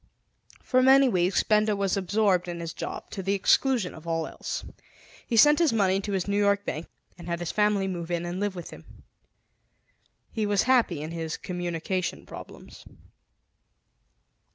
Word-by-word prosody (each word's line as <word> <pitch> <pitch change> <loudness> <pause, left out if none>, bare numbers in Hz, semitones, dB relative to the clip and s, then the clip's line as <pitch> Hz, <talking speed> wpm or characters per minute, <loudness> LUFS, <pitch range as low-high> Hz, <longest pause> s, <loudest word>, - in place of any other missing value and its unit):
For 255 -1 +2
many 270 +1 +6
weeks 185 -4 +2
Benda 215 0 +2
was 195 -2 0
absorbed 195 -1 +1
in 170 -1 -5
his 165 0 -5
job, - - -7
to 195 - -5
the 195 +2 0
exclusion 225 +1 +2
of 160 +1 -12
all 165 -1 -1
else. - - -6 0.6
He 230 - 0
sent 295 +7 +7
his 335 -4 +3
money 195 -3 +2
to 200 0 -4
his 190 -1 -1
New 200 0 +1
York 200 0 +2
bank 155 +3 -4 0.3
and 170 - -10
had 170 0 -1
his 175 -1 -3
family 210 -2 +1
move 175 -3 -5
in 175 0 -2
and 175 +2 -4
live 205 -1 -2
with 175 - -8
him. - - -15 1.3
He 215 -2 -1
was 205 -1 +2
happy 235 - +2
in 155 - -6
his 165 -1 -4
communication 175 +1 -3
problems. - - -11
195 Hz, 170 wpm, -26 LUFS, 175-210 Hz, 1.3 s, sent